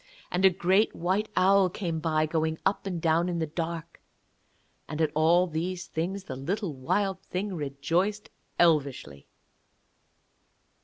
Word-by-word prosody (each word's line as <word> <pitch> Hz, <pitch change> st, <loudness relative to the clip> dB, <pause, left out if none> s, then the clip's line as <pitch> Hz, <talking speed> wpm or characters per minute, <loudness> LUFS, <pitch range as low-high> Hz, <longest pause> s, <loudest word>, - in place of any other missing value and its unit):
And 180 Hz, +1 st, 0 dB
a 190 Hz, -, +9 dB
great 190 Hz, +4 st, +2 dB
white 190 Hz, +5 st, 0 dB
owl 190 Hz, 0 st, +4 dB
came 170 Hz, -3 st, -3 dB
by, 155 Hz, -1 st, +1 dB
going 160 Hz, 0 st, -1 dB
up 200 Hz, 0 st, 0 dB
and 180 Hz, -3 st, -3 dB
down 165 Hz, +2 st, +2 dB
in 175 Hz, -, -2 dB
the 165 Hz, -, 0 dB
dark. 165 Hz, +1 st, -5 dB, 0.9 s
And 155 Hz, -, -5 dB
at 155 Hz, -2 st, +2 dB
all 165 Hz, +3 st, +4 dB
these 175 Hz, +2 st, -3 dB
things 185 Hz, +5 st, -3 dB
the 130 Hz, -, -6 dB
little 175 Hz, -, -3 dB
Wild 190 Hz, +9 st, -1 dB
Thing 195 Hz, +2 st, -4 dB
rejoiced 165 Hz, +7 st, -1 dB, 0.3 s
elvishly. 140 Hz, -, +1 dB
170 Hz, 140 wpm, -28 LUFS, 155-190 Hz, 0.9 s, a